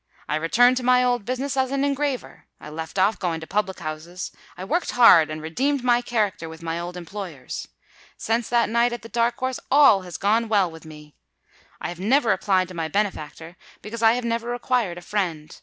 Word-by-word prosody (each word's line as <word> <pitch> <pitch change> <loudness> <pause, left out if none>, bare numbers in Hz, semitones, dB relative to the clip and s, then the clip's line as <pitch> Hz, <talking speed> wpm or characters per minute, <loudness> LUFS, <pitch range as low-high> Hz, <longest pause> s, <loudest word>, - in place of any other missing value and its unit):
I - - -1
returned 245 +11 +4
to 255 - -2
my 250 0 +4
old 245 -4 0
business 260 +3 -2
as 260 -1 +1
an 275 0 -1
engraver—I 280 - -4
left 160 +4 -7
off 200 +4 +2
going 170 -3 -2
to 160 - -8
public 195 +1 -1
houses—I 170 +3 -7
worked 335 - -1
hard, 175 -10 +7
and 155 0 -6
redeemed 265 - -1
my 245 -1 +3
character 210 -9 -1
with 160 +1 -11
my 165 0 -3
old 175 +1 -6
employers. 175 -6 -7 0.5
Since 230 +1 -1
that 240 -1 +3
night 235 +2 +2
at 240 - -6
the 230 - -10
Dark 235 +1 0
House 260 0 -2
all 275 -8 +6
has 180 -2 -8
gone 220 +3 +1
well 200 -5 +2
with 160 0 -13
me. 150 -1 -13 0.7
I - - -4
have 175 0 -8
never 240 +5 +3
applied 185 -1 +1
to - - -9
my 165 -2 -3
benefactor—because 180 +4 -5
I 225 0 +6
have 245 0 -2
never 235 0 -2
required 240 -6 -1
a - - -8
friend. 175 -6 -3
210 Hz, 195 wpm, -23 LUFS, 170-245 Hz, 0.7 s, hard